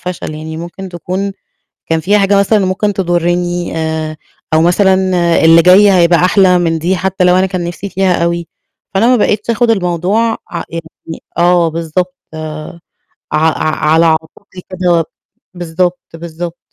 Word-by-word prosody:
فشل، 180 -3 -5
يعني 160 +1 -7
ممكن 175 +3 -8
تكون 185 +3 -4 0.6
كان 165 - +1
في 200 +6 +2
حاجة 200 0 +3
مثلًا 200 0 +2
ممكن 200 +2 -1
تضرّني، 175 -1 -1
آآ 160 -1 -3 0.4
أو 160 - +4
مثلًا 190 +3 +3 0.5
اللي 165 +1 +7
جاي 190 +4 +6
هيبقى 175 -2 +4
أحلى 185 -1 +4
من 165 -2 0
دي 180 +4 0
حتّى 190 +1 -1
لو 180 0 +4
أنا 185 +1 +3
كان 185 -2 -3
نِفْسي 175 +3 -6
فيها 185 -3 0
أوي، 170 0 -2 0.5
فأنا 200 +4 +2
ما 250 - +4
بقيتش 215 0 0
آخد 230 0 +2
الموضوع 195 +4 0
ع 170 -1 -4
يعني 165 0 -9
آه 175 -1 +3
بالضبط، 170 +3 -3 0.2
آآ 155 +1 -7 0.5
ع 150 - +1
ع 155 -1 -1
على 165 +1 +4
عاتقي 160 +3 -3
كده 175 -2 +1 0.5
بالضبط، 175 +1 -2
بالضبط. 170 +1 -7
175 Hz, 155 wpm, -13 LUFS, 165-190 Hz, 0.6 s, اللي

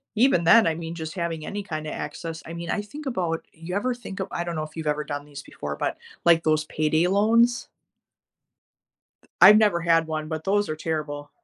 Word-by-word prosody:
even 220 -6 +4
then, 215 +6 +6
I 160 - +1
mean, 165 0 -6
just 160 -1 -6
having 165 -3 -3
any 205 0 -4
kinda 155 -5 -5
access, 165 -1 -6
I - - -8
mean, 170 0 -6
I 210 - -1
think 290 +9 -10
about 175 -11 -2
you 165 +3 -7
ever 245 +5 0
think 220 -5 -9
of 190 - -2
I 170 - -2
don't 170 -1 -4
know 155 - -1
if 155 0 -10
you've 160 -2 -5
ever 150 0 -5
done 145 +1 -5
these 145 -1 -9
before, 75 0 -6
but, - - -2 0.3
like, 170 -1 +5
those 155 -1 +2
payday 155 +2 +1
loans? 230 +5 +3 1.7
I've 210 - +10
never 205 -6 +3
had 165 -1 +3
one, 155 -1 -4
but 160 -1 -4
those 205 +1 +1
are 155 - -3
terrible. 150 -2 -4
165 Hz, 210 wpm, -25 LUFS, 155-200 Hz, 1.7 s, I've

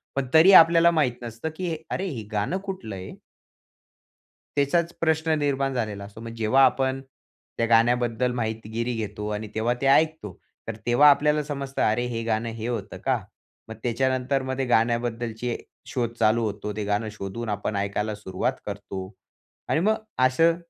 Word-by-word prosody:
पण 135 -1 -1
तरी 160 +5 +8
आपल्याला 170 0 +8
माहित 150 -7 +2
नसतं 115 +6 -5
की 175 -2 -2 0.2
"अरे 195 - -2
हे 120 - -5
गाणं 105 - -1
कुठलं 185 - -5
आहे?" 95 0 -8 1.5
त्याचाच 170 +5 +1
प्रश्न 160 0 +1
निर्माण 135 -2 0
झालेला 105 -4 -3
असतो. 100 +2 -11
मग 115 0 -7
जेव्हा 115 +5 +4
आपण 130 0 +1 0.6
त्या 115 - +2
गाण्याबद्दल 120 +1 +2
माहितीगिरी 115 0 -3
घेतो 105 -1 -4
आणि 110 0 -6
तेव्हा 115 +2 +1
ते 135 - 0
ऐकतो. 155 - +2 0.3
तर 110 - -3
तेव्हा 130 +5 +6
आपल्याला 150 +1 +3
समजतं 140 -2 -4
"अरे 110 +3 +2
हे 115 -1 -3
गाणं 115 0 -1
हे 115 0 -5
होतं 115 -5 -4
का?" - - +2 0.5
मग 110 - -6
त्याच्यानंतर 130 +2 0
मग 130 0 -3
गाण्याबद्दलची 120 0 0 0.3
शोध 120 -2 -1
चालू 115 +1 +3
होतो. 105 0 -3
ते 105 - -2
गाणं 105 +2 -1
शोधून 110 +3 -6
आपण 105 0 -2
ऐकायला 100 +2 -1
सुरुवात 100 +4 -2
करतो. 100 -1 -6 0.6
आणि 155 - +2
मग 215 +4 +3 0.3
असं 165 +6 +3
120 Hz, 155 wpm, -25 LUFS, 110-140 Hz, 1.5 s, तरी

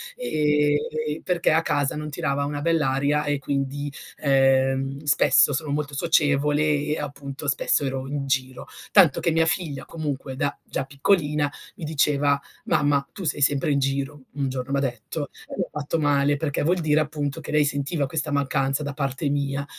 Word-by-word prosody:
e 150 - +1 0.3
e 150 - -2
e 155 - -5
perché 175 -3 +1
a 160 +1 +3
casa 145 -1 0
non 150 0 -5
tirava 140 -3 -1
una 145 0 -4
bella 155 -4 +1
aria 145 +2 +1
e 145 -1 -1
quindi, 140 +1 -3 0.3
ehm, 135 0 +2
spesso 145 -1 +6
sono 145 +1 -2
molto 145 0 -2
socievole 150 -1 +2 0.2
e, 150 +1 -1
appunto, 140 0 -7
spesso 140 +1 +3
ero 135 0 -3
in 140 -1 -3
giro; 130 -1 -2 0.2
tanto 175 -9 +5
che 170 - 0
mia 165 0 +2
figlia 150 -6 +1
comunque 145 -4 -5
da 145 +1 -1
già 135 - -3
piccolina 145 0 +1 0.3
mi - - -9
diceva: 145 -2 +2 0.3
“Mamma, 145 -1 +1
tu 195 - -8
sei 145 -2 0
sempre 145 +2 +4
in 140 - +2
giro”, 135 +1 -2
un 140 -2 -2
giorno 130 +1 -5
m'ha 140 - +1
detto, 135 +3 -4 0.2
e - - -10
mi - - 0
ha - - -9
fatto 145 +3 -2
male 145 -1 +2
perché 145 -2 -2
vuol 175 +3 +1
dire, 155 -1 +2
appunto, 150 -1 -3
che - - -7
lei 150 -1 +3
sentiva 140 +1 -1
questa 155 0 -2
mancanza 140 0 0
da 145 -1 -4
parte 140 0 -2
mia. 140 0 -2
145 Hz, 185 wpm, -24 LUFS, 140-150 Hz, 0.3 s, spesso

